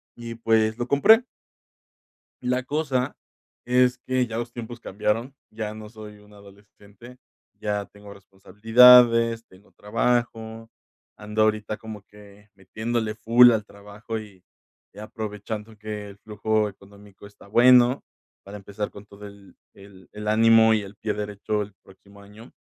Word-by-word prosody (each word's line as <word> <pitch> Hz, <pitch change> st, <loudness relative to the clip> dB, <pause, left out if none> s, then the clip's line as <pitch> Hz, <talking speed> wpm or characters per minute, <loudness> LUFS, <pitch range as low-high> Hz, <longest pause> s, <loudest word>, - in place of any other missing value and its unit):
y 115 Hz, -1 st, -8 dB
pues, 110 Hz, -1 st, +1 dB
lo 120 Hz, 0 st, -4 dB
compré. 220 Hz, -, +5 dB, 1.2 s
La 125 Hz, +1 st, -1 dB
cosa 135 Hz, -3 st, -2 dB, 0.5 s
es 125 Hz, 0 st, +2 dB
que 130 Hz, 0 st, -1 dB
ya 115 Hz, -1 st, -6 dB
los 120 Hz, 0 st, -5 dB
tiempos 120 Hz, 0 st, -8 dB
cambiaron, 110 Hz, +7 st, -3 dB
ya 110 Hz, -1 st, -6 dB
no 110 Hz, -1 st, -11 dB
soy 105 Hz, -2 st, -12 dB
un 105 Hz, 0 st, -21 dB
adolescente, 100 Hz, +4 st, -17 dB, 0.4 s
ya 105 Hz, -1 st, -3 dB
tengo 100 Hz, 0 st, -14 dB
responsabilidades, 115 Hz, +4 st, +4 dB
tengo 95 Hz, +2 st, -22 dB
trabajo, 115 Hz, 0 st, -2 dB, 0.5 s
ando 105 Hz, +1 st, -3 dB
ahorita 110 Hz, 0 st, 0 dB
como 110 Hz, -2 st, -10 dB
que 105 Hz, 0 st, -19 dB
metiéndole 110 Hz, +3 st, -4 dB
full 120 Hz, +2 st, +6 dB
al 110 Hz, -2 st, -1 dB
trabajo 105 Hz, +3 st, -9 dB
y 100 Hz, -4 st, -14 dB, 0.6 s
aprovechando 105 Hz, 0 st, -7 dB
que 105 Hz, -1 st, -7 dB
el 100 Hz, -, -17 dB
flujo 110 Hz, 0 st, -2 dB
económico 100 Hz, 0 st, -17 dB
está 100 Hz, -, -19 dB
bueno, 125 Hz, +3 st, +5 dB, 0.4 s
para 100 Hz, +1 st, -11 dB
empezar 100 Hz, +1 st, -6 dB
con 100 Hz, 0 st, -14 dB
todo 100 Hz, 0 st, -13 dB
el 100 Hz, -1 st, -17 dB, 0.2 s
el 95 Hz, -2 st, -17 dB
el 105 Hz, 0 st, -8 dB
ánimo 110 Hz, 0 st, +5 dB
y 110 Hz, -, +1 dB
el 100 Hz, 0 st, -11 dB
pie 110 Hz, 0 st, -4 dB
derecho 105 Hz, 0 st, -4 dB
el 105 Hz, -1 st, -7 dB
próximo 100 Hz, +1 st, -19 dB
año. 105 Hz, +4 st, -16 dB
110 Hz, 140 wpm, -24 LUFS, 105-115 Hz, 1.2 s, full